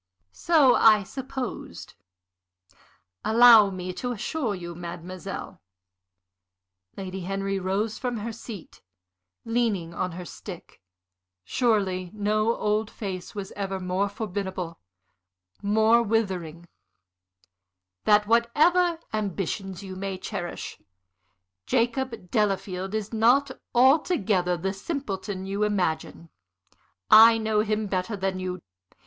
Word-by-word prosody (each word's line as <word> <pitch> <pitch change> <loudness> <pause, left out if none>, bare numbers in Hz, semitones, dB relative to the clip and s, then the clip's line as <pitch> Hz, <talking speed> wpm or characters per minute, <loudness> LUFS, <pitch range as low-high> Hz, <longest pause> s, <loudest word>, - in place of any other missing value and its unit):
"So 300 - +4
I 215 -3 +6
supposed. 250 - -6 1.3
Allow 225 -2 +7
me 185 -1 -5
to 245 +6 -4
assure 240 0 -2
you, 175 -2 -7
mademoiselle" 175 +2 -7 1.4
Lady 190 -1 -5
Henry 195 +1 -2
rose 200 +4 -2
from 245 -2 -2
her 225 +2 -4
seat, 220 -5 -10 0.6
leaning 225 -8 0
on 180 0 -3
her 180 +1 -7
stick; 155 - -10 0.6
surely 190 - 0
no 215 +2 +1
old 210 +1 0
face 190 -3 -6
was 200 -2 -5
ever 195 -1 -4
more 185 +2 -1
formidable, 190 -4 -5 0.8
more 220 +3 +4
withering 185 -7 -2 1.4
"that 210 0 +5
whatever 310 - +3
ambitions 195 -2 -3
you 190 -1 -7
may 195 0 -4
cherish, 185 -2 -6 0.9
Jacob 235 -5 -1
Delafield 195 -2 -1
is 215 0 -4
not 245 +6 +4 0.2
altogether 230 - +3
the 190 +3 -2
simpleton 200 - -4
you 200 +2 -3
imagine. 180 -5 -1 0.8
I 225 +1 +9
know 220 -1 0
him 215 0 0
better 195 +2 -2
than 190 -1 -2
you. 185 -1 -5
205 Hz, 105 wpm, -26 LUFS, 185-225 Hz, 1.4 s, I